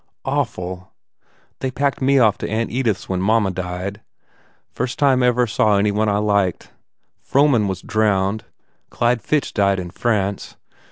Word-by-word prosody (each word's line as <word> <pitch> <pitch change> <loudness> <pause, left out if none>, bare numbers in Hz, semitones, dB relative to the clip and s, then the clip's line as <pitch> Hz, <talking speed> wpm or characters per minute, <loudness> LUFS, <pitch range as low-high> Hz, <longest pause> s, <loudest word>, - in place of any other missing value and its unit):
"Awful. 90 +1 -3 0.7
They 130 - -2
packed 140 0 -1
me 135 +1 +3
off 110 -6 +3
to - - -4
Aunt 115 +2 -1
Edith 120 -5 0
s - - -13
when 95 -1 -2
mamma 105 0 +2
died. 95 +3 -5 0.7
First 125 - -3
time 135 -3 +3
I 125 - +4
ever 125 0 +2
saw 105 -2 +2
any 105 +1 +2
one 105 +1 +1
I 100 - +1
liked.... 100 -3 0 0.5
Frohman 135 -6 +3
was 95 -1 -4
drowned. 105 -2 0 0.4
Clyde 120 0 0
Fitch 150 -2 -1
died 100 -2 +2
in 90 -1 -6
France. 100 -2 -2
105 Hz, 160 wpm, -20 LUFS, 95-120 Hz, 0.7 s, I